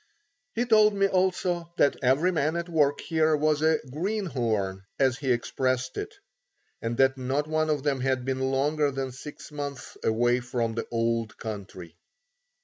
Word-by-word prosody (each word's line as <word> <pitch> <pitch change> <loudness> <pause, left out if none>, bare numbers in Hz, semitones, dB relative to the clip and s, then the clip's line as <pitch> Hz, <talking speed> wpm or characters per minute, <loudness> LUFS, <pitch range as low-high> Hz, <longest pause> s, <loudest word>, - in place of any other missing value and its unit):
He 240 +2 +1
told 215 -3 +5
me 195 0 +3
also 180 -2 0
that 140 - +4
every 140 +8 +3
man 155 -1 0
at 170 0 -2
work 150 -4 +2
here 160 -2 +2
was 155 0 +1
a 160 0 +4
"Green 195 +8 -2
horn," 110 - -1 0.2
as 130 -1 +2
he 135 -3 0
expressed 130 +1 0
it, - - -5 0.7
and 115 +1 -2
that 135 0 +3
not 135 +3 0
one 155 0 0
of 150 -3 0
them 140 -3 +1
had 130 -1 0
been 130 0 -1
longer 145 +2 +1
than 135 -1 -3
six 145 +5 -10
months 145 -2 -6
away 120 +2 +2
from 120 -2 -2
the 115 - -4
Old 115 -1 -1
Country. 95 -6 -8
135 Hz, 165 wpm, -27 LUFS, 125-155 Hz, 0.7 s, told